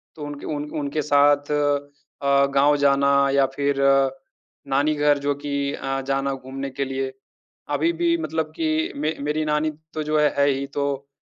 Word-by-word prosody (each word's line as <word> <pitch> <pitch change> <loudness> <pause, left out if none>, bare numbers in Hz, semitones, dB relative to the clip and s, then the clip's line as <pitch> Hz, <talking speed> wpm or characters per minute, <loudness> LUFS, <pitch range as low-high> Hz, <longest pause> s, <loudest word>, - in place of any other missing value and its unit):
तो 155 - -11
उनके 145 -1 -7
उन 150 -1 -4
उनके 145 +1 -2
साथ 145 0 +3
अ, 145 -1 0
गाँव 145 +2 +5
जाना 140 0 +3 0.2
या 140 -1 +4
फिर 140 0 0 0.9
नानी 140 +3 +2
घर 145 0 +3
जो 140 0 -1
कि 140 0 -2
अ, 135 0 -3
जाना 135 0 0
घूमने 135 +1 -6
के 135 +1 -3
लिए। 135 0 -3 0.6
अभी 160 +4 +2
भी 170 -1 +2
मतलब 160 0 -3
कि 160 0 0
मे 155 +2 -1
मेरी 150 +2 -1
नानी 150 +1 0 0.2
तो 155 -1 -3
जो 155 0 +1
है 150 - +4
है 140 - +4
ही, 135 0 -1
तो 140 -1 -3
145 Hz, 170 wpm, -23 LUFS, 140-150 Hz, 0.9 s, गाँव